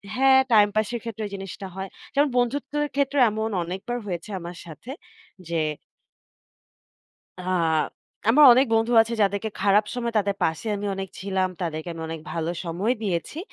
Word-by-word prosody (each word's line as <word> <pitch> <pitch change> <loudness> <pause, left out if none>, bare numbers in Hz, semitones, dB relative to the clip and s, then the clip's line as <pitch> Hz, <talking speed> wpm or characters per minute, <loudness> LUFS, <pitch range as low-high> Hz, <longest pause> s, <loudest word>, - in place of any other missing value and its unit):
হ্যাঁ, 265 0 +6
টাইম 210 -1 +7
পাসের 220 +2 0
ক্ষেত্রেও 220 -2 -5
এই 200 - -12
জিনিসটা 195 0 -7
হয়। 190 0 -5 0.2
যেমন 290 +1 +3
বন্ধুত্বের 285 +4 0
ক্ষেত্রেও 280 -1 +2
এমন 220 +1 -2
অনেকবার 195 +8 -4
হয়েছে 175 -1 -5
আমার 175 0 -8
সাথে 170 - -10 0.6
যে 165 -1 0 1.8
আ - - -7 0.9
আমার 295 +6 +7
অনেক 260 +3 +4
বন্ধু 225 +2 +2
আছে 230 +1 -4
যাদেরকে 200 +2 0
খারাপ 205 +2 +4
সময় 235 -1 -2
তাদের 200 -1 0
পাশে 160 +7 -1
আমি 205 +1 -4
অনেক 190 0 -5
ছিলাম। 190 -1 0
তাদেরকে 160 -1 -3
আমি 165 - -7
অনেক 165 0 -5
ভালো 165 0 -2
সময় 180 +8 0
দিয়েছি। 190 - -2
205 Hz, 155 wpm, -24 LUFS, 185-240 Hz, 1.8 s, টাইম